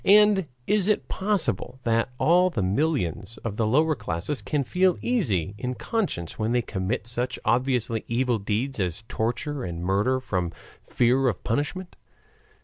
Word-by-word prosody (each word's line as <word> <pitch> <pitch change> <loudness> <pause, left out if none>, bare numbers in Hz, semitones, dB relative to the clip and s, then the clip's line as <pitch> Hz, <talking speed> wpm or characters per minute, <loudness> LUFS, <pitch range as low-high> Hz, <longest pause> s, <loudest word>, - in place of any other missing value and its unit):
And 205 -3 +5 0.2
is 205 +1 +2
it 210 - +1
possible 190 - -1
that 115 +1 +1
all 180 +5 +4
the 110 - -2
millions 110 - 0
of 110 -3 -2
the 110 - +1
lower 155 +7 +3
classes 105 - -3
can 140 +8 -1
feel 180 +6 +2
easy 105 - 0
in 125 0 -3
conscience 180 - -2
when 110 +2 0
they 120 -1 +2
commit 95 +4 -2
such 120 +1 -1
obviously 120 -1 +1
evil 120 -1 +1
deeds 110 +6 -2
as 90 +2 -2
torture 125 +5 -2
and 85 -1 -5
murder 105 +8 +2
from 90 -8 -2 0.3
fear 130 +2 +2
of 110 -8 -1
punishment? 150 +9 -2
125 Hz, 150 wpm, -25 LUFS, 105-155 Hz, 0.3 s, And